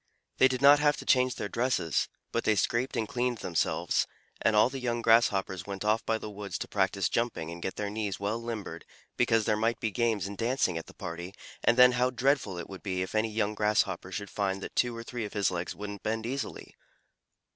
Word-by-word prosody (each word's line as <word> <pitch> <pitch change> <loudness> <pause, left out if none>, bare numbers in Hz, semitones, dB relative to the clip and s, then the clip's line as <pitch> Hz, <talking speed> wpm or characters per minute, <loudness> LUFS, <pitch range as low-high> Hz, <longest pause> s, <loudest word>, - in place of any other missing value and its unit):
They 130 - +8
did 130 0 -3
not 145 +1 +8
have 150 0 +3
to - - -8
change 130 -1 +3
their - - -3
dresses, 115 - 0 0.2
but 115 - -1
they 110 - +3
scraped 120 +6 0
and 110 -2 0
cleaned 125 +1 -1
themselves, 85 -6 0 0.3
and 110 - +3
all 105 +2 +6
the 135 +1 -5
young 120 -2 -2
Grasshoppers 105 -5 +3
went 100 0 -5
off 110 +2 +2
by 110 - +2
the 110 - -7
woods 100 -1 -5
to - - -5
practise - - +1
jumping 115 -9 -2
and 85 0 -8
get 95 - -3
their 105 -1 -3
knees 105 -2 -3
well 105 +3 -2
limbered, 115 -3 -5 0.3
because 115 -1 +2
there 105 - +2
might 115 +2 0
be 110 - -1
games 110 -2 0
and 100 0 -7
dancing 115 -6 +1
at 80 - -5
the - - -14
party, 85 +3 -6 0.3
and 120 - +4
then 125 0 +8
how 125 0 +2
dreadful 130 -6 +1
it 85 - -6
would 95 -1 -9
be 95 -2 -2
if 95 - -7
any 110 +1 +1
young 105 -1 0
Grasshopper 105 -3 0
should 100 +2 -5
find 100 -1 -1
that - - -7
two 120 -2 +1
or 115 - -6
three 120 0 -5
of 105 - -6
his 100 -3 +1
legs 85 0 -3
wouldn't 100 -1 -7
bend 110 +1 -2
easily! 135 +3 -5
110 Hz, 225 wpm, -29 LUFS, 100-120 Hz, 0.3 s, They